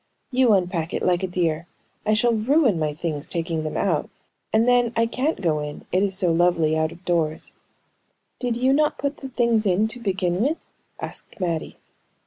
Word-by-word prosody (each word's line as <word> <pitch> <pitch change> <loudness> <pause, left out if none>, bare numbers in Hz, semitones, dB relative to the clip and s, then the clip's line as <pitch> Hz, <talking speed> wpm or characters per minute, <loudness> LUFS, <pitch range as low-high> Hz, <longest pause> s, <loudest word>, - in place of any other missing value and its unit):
"You 250 -3 +4
unpack 175 -4 0
it, - - -2
like 180 0 +2
a 190 - -1
dear! 170 -2 -1 0.4
I 215 - +4
shall 235 +2 +3
ruin 235 - +3
my 155 -1 0
things 150 -1 -4
taking 165 -1 -2
them 155 - -3
out; 170 -7 0 0.4
and 225 +2 +3
then, 245 -1 +3
I 230 0 +3
can't 260 +7 -1
go 160 -5 +1
in, 150 0 -6
it 185 - +2
is 195 -2 0
so 180 -3 +2
lovely 165 -2 +3
out 160 0 +1
of 175 +1 -14
doors." 160 -3 -1 0.9
"Did 245 -2 -1
you 260 +2 +3
not 300 +1 +2
put 285 +1 -2
the 270 - -7
things 235 -4 +2
in, 195 +4 +3
to 245 - -6
begin 190 -4 0
with?" 295 +7 +1 0.4
asked - - -8
Mattie. 170 -4 -2
190 Hz, 190 wpm, -23 LUFS, 165-235 Hz, 0.9 s, You